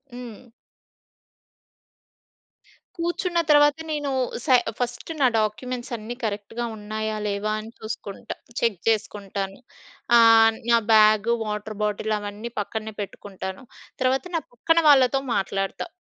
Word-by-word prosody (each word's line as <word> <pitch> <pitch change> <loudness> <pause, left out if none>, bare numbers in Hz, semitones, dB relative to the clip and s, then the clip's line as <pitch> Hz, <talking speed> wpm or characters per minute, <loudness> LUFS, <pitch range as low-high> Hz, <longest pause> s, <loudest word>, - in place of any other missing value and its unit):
హ్మ్. 245 -1 -10 2.5
కూర్చున్న 345 +1 -1
తర్వాత 295 0 +6
నేను 295 -2 -2 0.4
సె 260 -4 +6 0.2
ఫస్ట్ 245 +5 -3
నా 260 - +6
డాక్యుమెంట్స్ 240 +4 -2
అన్నీ 220 +3 -7
కరెక్ట్‌గా 215 +2 -3
ఉన్నాయా 215 +1 -3
లేవా 205 +1 -1
అని 220 +1 -9
చూసుకుంటా. 215 -2 -6 0.2
చెక్ 230 -5 +1
చేసుకుంటాను. 200 -3 -2 0.6
ఆహ్, 225 -1 +7
నా 235 - +6
బ్యాగు, 215 +1 +5
వాటర్ 210 0 -4
బాటిలు 210 +1 0
అవన్నీ 205 +3 -6
పక్కనే 220 +1 -4
పెట్టుకుంటాను. 190 0 -7 0.4
తర్వాత 260 +1 +2
నా 330 - +1
పక్కన 330 +7 +2
వాళ్ళతో 270 -1 +5 0.2
మాట్లాడతా. 195 - -2
220 Hz, 110 wpm, -24 LUFS, 210-250 Hz, 2.5 s, ఆహ్